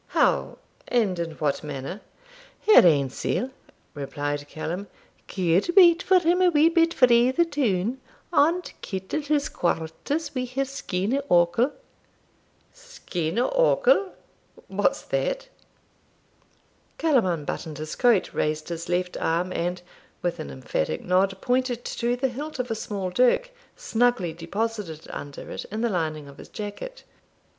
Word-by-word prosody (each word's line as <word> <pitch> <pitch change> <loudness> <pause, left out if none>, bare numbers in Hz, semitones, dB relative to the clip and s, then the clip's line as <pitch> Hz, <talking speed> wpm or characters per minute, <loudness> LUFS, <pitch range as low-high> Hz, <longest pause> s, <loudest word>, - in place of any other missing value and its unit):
'How, - - +2 0.3
and 210 -8 +1
in 165 -1 -3
what 150 -1 -1
manner?' 145 +6 -6 0.6
'Her 430 - +8
ain 140 -5 +3
sell,' 255 - -2 0.4
replied 145 0 -4
Callum, 175 +6 -5 0.4
'could 180 - +1
wait 345 -3 +8
for 375 - +4
him 355 +1 +2
a 365 - +6
wee 315 0 +5
bit 330 0 +3
frae 245 -4 +5
the 340 +7 +2
toun, 250 - -1 0.3
and 335 +4 +2
kittle 190 +9 -3
his 295 0 0
quarters 170 - -2
wi'her 255 +1 -2
skene 255 -2 -2
occle.' 175 +10 +3 1.0
'Skene 215 - -5
occle! - - +3 0.6
what's - - 0
that?' - - -2 1.5
Callum 275 - +3
unbuttoned 160 -2 -3
his 155 0 -5
coat, 240 -6 +3
raised 155 +1 -1
his 170 0 -5
left 180 0 -1
arm, 175 +3 0
and, 175 +1 -2 0.4
with 175 -1 -1
an - - -5
emphatic 65 +3 -3
nod, 190 +2 +2
pointed 250 -1 0
to 240 +1 -1
the 260 +2 0
hilt 290 +5 -6
of 250 -2 -3
a - - +2
small 200 -4 -4
dirk, 255 - +3 0.2
snugly 245 - +1
deposited 175 -1 -4
under 145 -1 -8
it, - - -5
in 215 +2 -5
the 235 - +1
lining 155 -6 -2
of 140 - -14
his - - -11
jacket. 215 - -7
210 Hz, 135 wpm, -25 LUFS, -, 1.5 s, Her